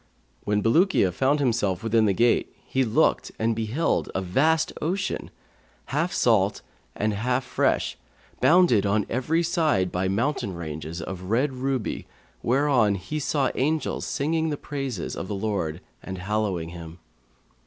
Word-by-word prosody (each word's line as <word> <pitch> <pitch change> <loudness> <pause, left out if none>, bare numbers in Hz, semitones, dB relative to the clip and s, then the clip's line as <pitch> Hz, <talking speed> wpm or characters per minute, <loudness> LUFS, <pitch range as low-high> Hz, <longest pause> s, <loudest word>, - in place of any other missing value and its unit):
When 105 0 +1
Bulukiya 155 - +3
found 135 - +1
himself 115 -8 0
within 115 -1 +3
the 100 - +3
gate, 120 +4 +2
he 130 - +1
looked 110 -3 +2
and 115 +1 +1
beheld 115 +9 0
a 95 - 0
vast 155 - +2
ocean, 190 +5 -2 0.6
half 165 +5 +1
salt 105 -4 +2 0.3
and 105 0 0
half 125 +5 0
fresh, 125 - 0 0.4
bounded 170 - +5
on 105 0 +1
every 155 +8 +1
side 160 - +1
by 90 +1 0
mountain 110 0 -1
ranges 80 0 -6
of 95 +1 -7
red 130 +5 +1
ruby 130 -2 -2 0.3
whereon 125 -5 +3
he 100 +12 -4
saw 140 -1 0
angels 155 +4 -1
singing 160 +2 0
the 145 - -2
praises 135 - -4
of - - -5
the 105 - -3
Lord 95 -6 -2 0.2
and 95 0 -6
hallowing 95 -3 -1
Him. 85 -1 -9
115 Hz, 145 wpm, -25 LUFS, 95-145 Hz, 0.6 s, bounded